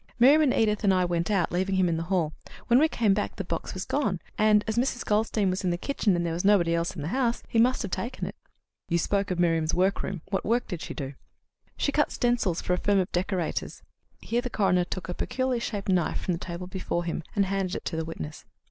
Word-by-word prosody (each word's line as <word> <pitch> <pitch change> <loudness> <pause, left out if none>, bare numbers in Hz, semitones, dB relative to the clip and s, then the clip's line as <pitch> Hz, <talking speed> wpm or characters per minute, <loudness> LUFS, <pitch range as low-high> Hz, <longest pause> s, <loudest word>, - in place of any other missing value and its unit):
Miriam 275 +6 +7
and 290 -4 +4
Edith 215 -1 +2
and 200 - +4
I 185 -1 +3
went 170 0 -1
out, 195 -4 +1
leaving 190 +2 0
him 185 -1 +3
in 170 - +1
the - - -2
hall. 170 -5 +1 0.3
When 240 +1 +5
we 315 - +5
came 225 -9 +2
back 205 +1 -2
the 195 - -4
box 170 0 -4
was 185 - -4
gone, 215 -11 0 0.2
and, 210 -1 +4
as 220 - -1
Mrs. 245 +1 0
Goldstein 210 -2 +1
was 185 +2 -3
in 185 - +1
the 175 - 0
kitchen 210 -2 0
and 175 0 0
there 165 - -1
was 170 - -2
nobody 190 -5 +4
else 170 +2 -1
in 150 - -5
the 155 - -3
house, 240 +1 0
he 225 - +1
must 250 +2 +3
have 200 - -5
taken 250 +2 -3
it." - - -5 0.6
"You 170 - +2
spoke 200 +3 0
of 180 - -1
Miriam's 165 -2 +2
workroom. 190 -1 0
What 195 - 0
work 235 +3 +1
did 175 -5 -5
she - - -6
do?" 140 -1 -5 0.6
"She 285 - +1
cut 295 +1 +2
stencils 240 -8 0
for 180 - 0
a 180 - 0
firm 205 +2 +2
of 185 -1 0
decorators." 180 -2 -2 0.4
Here 235 +1 -1
the 250 - -4
coroner 185 -5 +2
took 180 0 -5
a 180 - -3
peculiarly 255 +5 -1
shaped 205 -4 -4
knife 180 -4 +1
from - - -1
the 165 - -3
table 175 0 -6
before 185 -2 -3
him, 170 0 -2
and 200 -2 +3
handed 190 -1 -1
it - - -6
to - - -2
the 160 - -1
witness. 155 -2 -7
190 Hz, 250 wpm, -27 LUFS, 175-220 Hz, 0.6 s, Miriam